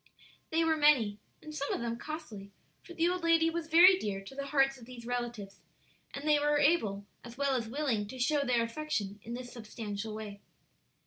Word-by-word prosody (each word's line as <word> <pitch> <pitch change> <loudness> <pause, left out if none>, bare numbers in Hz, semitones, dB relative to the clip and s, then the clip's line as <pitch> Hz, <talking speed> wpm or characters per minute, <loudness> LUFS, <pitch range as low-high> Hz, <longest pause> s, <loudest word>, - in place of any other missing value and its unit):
They 325 +1 +2
were 320 -1 +2
many, 250 -9 +4 0.2
and 310 - -9
some 280 -2 -3
of - - -1
them 235 -1 -2
costly, 230 -11 -7 0.3
for 345 - -12
the 330 +1 +2
old 360 0 -1
lady 330 -1 +3
was 335 -1 -4
very 360 +4 +7
dear 195 - -3
to 195 - -11
the 280 +1 -5
hearts 270 -1 +2
of 235 - -13
these 245 -2 -10
relatives, 240 -5 -4 0.5
and 280 +2 -5
they 300 -1 +5
were 295 0 +2
able 225 -10 +2 0.2
as 235 0 -11
well 280 -1 +1
as 235 -3 -2
willing 235 -5 -1
to 260 - -9
show 280 +4 +2
their 245 -3 +2
affection 230 -5 -3
in 235 +3 -6
this 245 0 -8
substantial 215 -2 -6
way. 205 -2 -8
255 Hz, 200 wpm, -31 LUFS, 220-305 Hz, 0.5 s, very